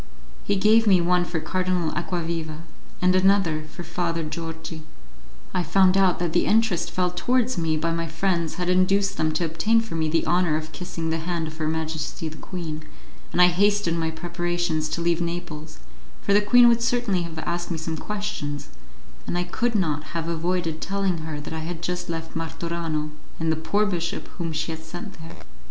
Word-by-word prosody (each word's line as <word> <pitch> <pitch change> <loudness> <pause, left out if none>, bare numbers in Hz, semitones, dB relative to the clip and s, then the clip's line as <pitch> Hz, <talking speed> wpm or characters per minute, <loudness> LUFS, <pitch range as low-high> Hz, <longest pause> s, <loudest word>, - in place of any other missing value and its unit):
He 205 - +1
gave 215 +3 +5
me 190 -3 +6
one 175 +1 +3
for 175 -2 -2
Cardinal 180 -1 0
Acquaviva, 165 -3 -3 0.4
and 185 0 +5
another 185 -5 +3
for 155 +3 -9
Father 170 -1 -1
Georgi. 160 +1 -5 0.7
I 180 - +1
found 185 +3 +4
out 190 -2 +4
that 170 -2 -1
the - - +3
interest 200 -6 +3
felt 180 0 0
towards 250 +5 +2
me 160 -3 +1
by 165 +2 0
my 165 0 -1
friends 170 0 0
had 180 -1 -2
induced 185 +2 +3
them 155 0 +2
to 170 +2 0
obtain 165 +8 +3
for 225 -4 -4
me 160 -1 0
the 165 +1 +1
honour 175 -3 +3
of 155 0 -6
kissing 165 -2 -4
the 165 - 0
hand 170 0 -2
of 155 0 -7
Her 155 -1 -1
Majesty 160 0 -2
the 155 0 -7
Queen, 160 -4 -5 0.5
and - - -1
I 180 0 +8
hastened 195 -2 +2
my 160 0 0
preparations 175 -1 -1
to 170 - -2
leave 170 0 +2
Naples, 170 -2 -5 0.5
for 200 - +2
the 205 - +6
queen 240 +3 +7
would 235 0 +4
certainly 230 -5 +1
have 170 -1 -6
asked 175 +2 -2
me 170 - -2
some 160 0 -3
questions, 160 -8 -4 0.6
and 175 - -1
I 175 - +1
could 225 +6 -1
not 155 -5 -1
have 165 0 -2
avoided 170 -1 -1
telling 195 -3 0
her 155 -1 -5
that 145 - -6
I 160 - -3
had 165 +1 -5
just 180 0 -2
left 165 -1 -5
Martorano 165 -2 -2 0.3
and 160 0 +1
the - - +2
poor 200 +7 +1
bishop 175 -1 -2
whom 165 -1 -2
she 160 +1 -2
had 160 0 -6
sent 175 +4 -8
there. 165 +1 -10
170 Hz, 195 wpm, -25 LUFS, 160-185 Hz, 0.7 s, I